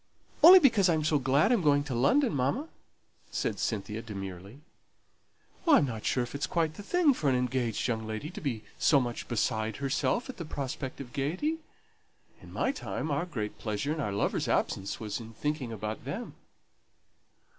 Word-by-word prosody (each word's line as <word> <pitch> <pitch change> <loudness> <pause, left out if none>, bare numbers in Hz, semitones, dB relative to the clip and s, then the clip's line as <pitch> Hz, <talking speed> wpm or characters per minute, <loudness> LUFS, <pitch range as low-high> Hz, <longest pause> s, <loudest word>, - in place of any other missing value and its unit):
"Only 355 +4 +11
because 225 - +5
I'm 160 -2 +2
so 150 -1 +2
glad 140 - +3
I'm 235 -5 +3
going 145 -3 +3
to 145 -3 -5
London, 245 - +3
mamma," 145 - -1 0.6
said - - -2
Cynthia, 105 0 -2
demurely. 100 +2 -8 1.1
"I'm 290 - +6
not 115 -5 -5
sure 125 - +1
if 120 - -8
it's 140 - -2
quite 165 -2 0
the 180 - -9
thing 320 - +3
for 150 - 0
an 130 - +2
engaged 125 -3 -1
young 110 -2 -2
lady 110 +9 -5
to - - -8
be 120 -7 -3 0.2
so 145 - +5
much 120 -2 -4
beside 110 -2 -1
herself 140 - 0
at 260 - -8
the 170 - -5
prospect 135 -3 -5
of 125 -3 -10
gaiety. 185 - -1 0.8
In - - -13
my - - 0
time, 160 - -4
our 145 +5 -1
great 105 -10 -5
pleasure 110 +7 -2
in 160 - -5
our 105 -8 -1
lovers' 100 - -1
absence 95 0 -1
was 105 -1 -4
in 115 -1 -10
thinking 150 -1 -3
about 110 -1 -5
them." - - -5
135 Hz, 175 wpm, -29 LUFS, 110-165 Hz, 1.1 s, Only